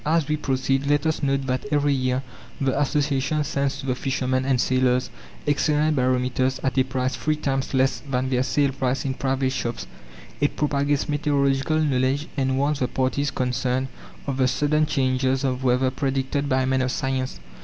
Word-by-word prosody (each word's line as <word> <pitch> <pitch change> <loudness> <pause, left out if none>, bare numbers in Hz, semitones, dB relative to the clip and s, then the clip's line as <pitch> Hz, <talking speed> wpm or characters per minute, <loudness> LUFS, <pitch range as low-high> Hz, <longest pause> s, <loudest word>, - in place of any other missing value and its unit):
As 160 -1 +1
we 150 - +1
proceed, 135 -1 0
let 145 +1 +2
us 160 -1 0
note 135 -1 0
that 130 +1 -2
every 145 -1 +2
year 130 0 0 0.4
the 135 +1 +1
Association 145 +1 +1
sends 140 -2 -1
to - - -6
the 130 - +1
fishermen 130 0 -1
and 130 -2 +2
sailors 130 0 +1 0.3
excellent 150 +1 +2
barometers 130 0 +1
at 130 -1 0
a - - +5
price 130 0 -2
three 155 0 0
times 135 -3 -2
less 130 -2 +2
than 130 0 -1
their 125 -1 +2
sale 140 +1 +1
price 135 0 -1
in 135 - 0
private 130 0 0
shops. 120 -2 -3 0.5
It 145 - +1
propagates 145 -1 +1
meteorological 145 0 +1
knowledge, 135 0 +1
and 130 -2 0
warns 145 +1 +1
the 125 - +1
parties 135 +3 0
concerned 125 +1 -1 0.4
of 135 -2 -2
the 130 -1 +3
sudden 150 +4 +1
changes 130 -1 +1
of 130 -1 -1
weather 130 +1 +2
predicted 135 +1 -1
by 130 -1 +2
men 130 0 +1
of 130 0 0
science. 130 - -2
135 Hz, 175 wpm, -24 LUFS, 130-145 Hz, 0.5 s, a